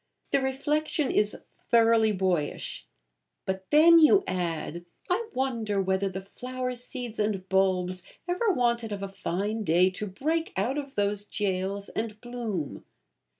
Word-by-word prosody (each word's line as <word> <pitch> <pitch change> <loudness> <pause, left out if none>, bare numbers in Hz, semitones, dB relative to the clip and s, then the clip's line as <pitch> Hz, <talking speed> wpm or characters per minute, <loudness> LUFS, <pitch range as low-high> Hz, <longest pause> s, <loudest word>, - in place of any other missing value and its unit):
The 275 - +3
reflection 285 +2 0
is 210 0 +2 0.3
thoroughly 230 -2 +5
boyish; 185 -6 -1 0.6
but 190 0 -3
then 330 +3 +8
you 385 +5 +6
add, 170 -2 -3 0.3
'I 445 +5 +1
wondered 230 -7 0
whether 190 +1 +1
the 190 +1 -6
flower 250 +5 -4
seeds 245 -1 -5
and 205 -3 -1
bulbs 185 -1 +1 0.3
ever 365 +6 +1
wanted 235 - +1
of 200 -1 -4
a - - -2
fine 200 +3 -2
day 180 +1 +4
to 210 +3 -4
break 315 - -1
out 245 +9 0
of 275 -1 -8
those 205 0 0
jails 200 -1 -2
and 215 -1 -4
bloom.' 225 - -4
210 Hz, 140 wpm, -28 LUFS, 190-255 Hz, 0.6 s, then